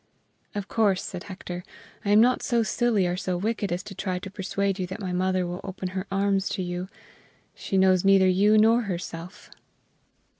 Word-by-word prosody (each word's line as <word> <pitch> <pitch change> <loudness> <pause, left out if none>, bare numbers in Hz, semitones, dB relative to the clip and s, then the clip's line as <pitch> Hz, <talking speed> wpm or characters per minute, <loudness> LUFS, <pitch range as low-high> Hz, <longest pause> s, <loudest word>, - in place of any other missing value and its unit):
"Of 205 -1 -3
course," 205 -4 +2
said 180 -2 -6
Hector, 180 -2 -7 0.4
"I 205 - -2
am 205 +1 +6
not 245 +3 +4
so 235 -2 +1
silly 225 -3 +1
or 175 0 0
so 180 -1 -2
wicked 205 0 -2
as 175 +1 -2
to 205 - -9
try 190 -1 -3
to 190 +2 -7
persuade 195 0 -2
you 185 - -2
that 190 +4 -7
my 185 -3 -4
mother 185 0 +1
will 175 +2 -5
open 190 -1 -5
her 190 +2 -4
arms 195 0 +1
to 185 - -2
you. 180 +1 -4 0.6
She 195 - -3
knows 185 -1 +4
neither 195 -1 +5
you 200 +4 +4
nor 225 +3 +5
herself." 175 +2 -6
190 Hz, 190 wpm, -26 LUFS, 180-205 Hz, 0.6 s, am